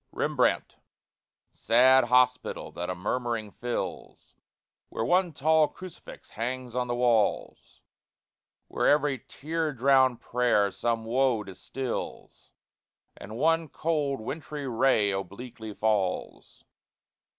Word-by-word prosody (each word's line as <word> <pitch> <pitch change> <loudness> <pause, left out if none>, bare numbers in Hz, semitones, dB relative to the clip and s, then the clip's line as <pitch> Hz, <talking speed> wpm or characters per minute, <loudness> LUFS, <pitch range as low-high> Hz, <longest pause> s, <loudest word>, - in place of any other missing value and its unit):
REMBRANDT, - - 0 0.7
sad 130 +2 +4
hospital 125 +1 +1
that 90 +1 -5
a 90 - -2
murmuring 115 +3 -3
fills, 120 +2 -6 0.6
Where 110 - -3
one 180 +6 +2
tall 155 +1 +3
crucifix 185 +1 -12
hangs 125 +2 -4
on 125 0 -1
the 120 - -1
walls, 120 -4 0 0.9
Where - - 0
every 145 -2 +2
tear 160 +2 -3
drowned 130 -1 +3
prayer 120 -5 +1
some 115 +3 -2
woe 125 -1 +1
distils, 115 +7 -6 0.6
And 110 +3 -9
one 165 +3 +2
cold, 150 -5 -1
wintry 145 +2 -6
ray 115 -4 +2
obliquely 110 +4 -6
falls. 105 -3 -2
125 Hz, 105 wpm, -27 LUFS, 110-135 Hz, 0.9 s, sad